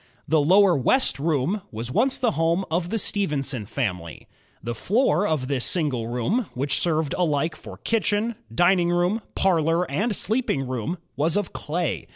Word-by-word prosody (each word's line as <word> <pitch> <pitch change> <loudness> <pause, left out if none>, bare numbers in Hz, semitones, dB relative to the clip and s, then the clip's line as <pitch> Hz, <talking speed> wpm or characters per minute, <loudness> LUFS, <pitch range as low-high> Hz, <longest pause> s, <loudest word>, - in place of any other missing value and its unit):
The 155 -1 +3
lower 185 +4 +5
west 200 - +2
room 160 +6 0
was 115 +3 -4
once 250 - +2
the 245 -3 +1
home 165 +3 0
of 170 +1 0
the 225 - -1
Stephenson 140 - -1
family. 90 - -4 0.4
The 120 - -3
floor 205 - +1
of 145 -5 -1
this 135 -3 -1
single 145 - 0
room, 150 - -1
which 135 +2 0
served 160 -4 0
alike 160 -1 0
for - - -11
kitchen, 220 0 0 0.2
dining 175 +7 +3
room, 175 +5 +1
parlor, 165 -2 +2
and 205 +9 0
sleeping 215 - 0
room, 130 +7 -3 0.2
was 155 +6 +1
of 205 -3 -2
clay. 170 +3 -3
165 Hz, 160 wpm, -24 LUFS, 135-195 Hz, 0.4 s, lower